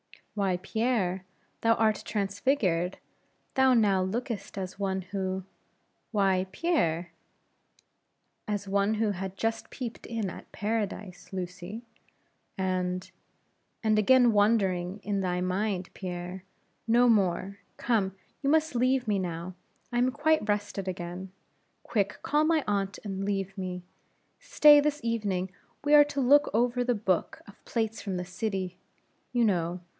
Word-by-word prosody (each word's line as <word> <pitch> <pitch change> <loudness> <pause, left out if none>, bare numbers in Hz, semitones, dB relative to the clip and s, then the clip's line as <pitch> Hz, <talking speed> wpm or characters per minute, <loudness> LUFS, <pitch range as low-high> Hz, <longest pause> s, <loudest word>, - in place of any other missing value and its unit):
"Why, 195 -3 0
Pierre, 195 -5 0 0.3
thou 230 0 +4
art 220 -2 +2
transfigured; 200 -3 0 0.6
thou 265 -1 +5
now 200 -5 +4
lookest 205 +1 -3
as 190 0 -5
one 190 -1 -1
who 190 0 -3 0.7
why, 190 -3 +2
Pierre?" 175 - 0 1.4
"As 205 -1 -2
one 200 +2 +2
who 215 -1 +1
had 190 0 -5
just 225 +2 -2
peeped 240 -4 -6
in 225 -5 -2
at - - -11
paradise, 210 -3 -3
Lucy; 185 +4 -6 0.7
and 185 -1 -1 0.4
" - - -46
"Again 225 +3 +5
wandering 200 -3 +2
in 200 -1 -1
thy 180 -1 0
mind, 185 0 -1
Pierre; 180 0 -6 0.4
no 240 +2 +5
more 200 -2 +2 0.2
Come, 205 -6 0 0.3
you 280 - +1
must 315 0 +3
leave 255 0 +2
me, 205 -2 +2
now. 175 0 -4 0.4
I 240 - +1
am 250 +1 +3
quite 300 -5 +1
rested 205 -2 -1
again. 180 +1 -5 0.5
Quick, 205 -2 -1
call 300 +1 +2
my 320 -2 +3
aunt, 200 -1 -1
and 195 -2 -4
leave 195 -1 -2
me. 180 -2 -5 0.6
Stay, 300 -12 +7
this 295 0 0
evening 200 -5 -1 0.3
we 290 +1 +2
are 295 -1 +9
to 285 -1 -2
look 285 +3 +5
over 245 +1 +2
the 245 -1 +1
book 190 -4 -1
of 200 - -16
plates 225 -1 -2
from 195 -3 -3
the 180 - -3
city, 185 -1 -3 0.5
you 240 -1 +3
know. 175 -3 0
200 Hz, 135 wpm, -28 LUFS, 185-230 Hz, 1.4 s, are